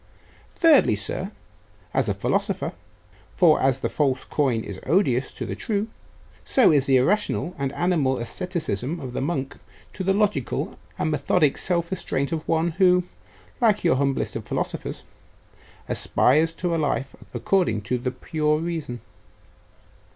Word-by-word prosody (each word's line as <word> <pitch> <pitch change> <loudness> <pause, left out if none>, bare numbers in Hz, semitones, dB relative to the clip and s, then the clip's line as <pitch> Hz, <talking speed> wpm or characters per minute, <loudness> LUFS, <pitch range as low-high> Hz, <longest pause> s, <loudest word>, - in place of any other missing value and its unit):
Thirdly, 330 -3 +5
sir, - - -2 0.6
as - - +1
a - - 0
philosopher; - - -1 0.6
for 170 -5 +5
as 130 -1 +3
the - - +1
false 135 -3 0
coin 130 -7 0
is 95 -2 -7
odious 135 -9 +2
to - - -5
the - - -4
true, 215 0 -2 0.5
so 255 -9 +4
is 140 -3 +3
the 135 -1 +5
irrational 180 +4 +1
and 135 -1 -1
animal 155 -7 +1
asceticism 155 - -3
of 130 -4 -7
the - - -2
monk, 135 -2 -2 0.4
to 190 - -4
the 195 - +2
logical 200 - -1 0.2
and 155 - 0
methodic 150 0 +2
self 170 -1 0
restraint 140 -7 -1
of 160 -2 -3
one 165 +1 +1
who, 180 +1 +4 0.6
like 215 -3 +3
your 165 -7 +3
humblest 135 -1 0
of - - -5
philosophers, - - -3 0.8
aspires 155 +5 +3
to 175 +1 -2
a - - +1
life 135 -2 -1 0.2
according 175 - +1
to 125 +6 -1
the 125 - -1
pure 150 +3 -1
reason. 160 -8 -4
155 Hz, 145 wpm, -24 LUFS, 135-180 Hz, 0.8 s, Thirdly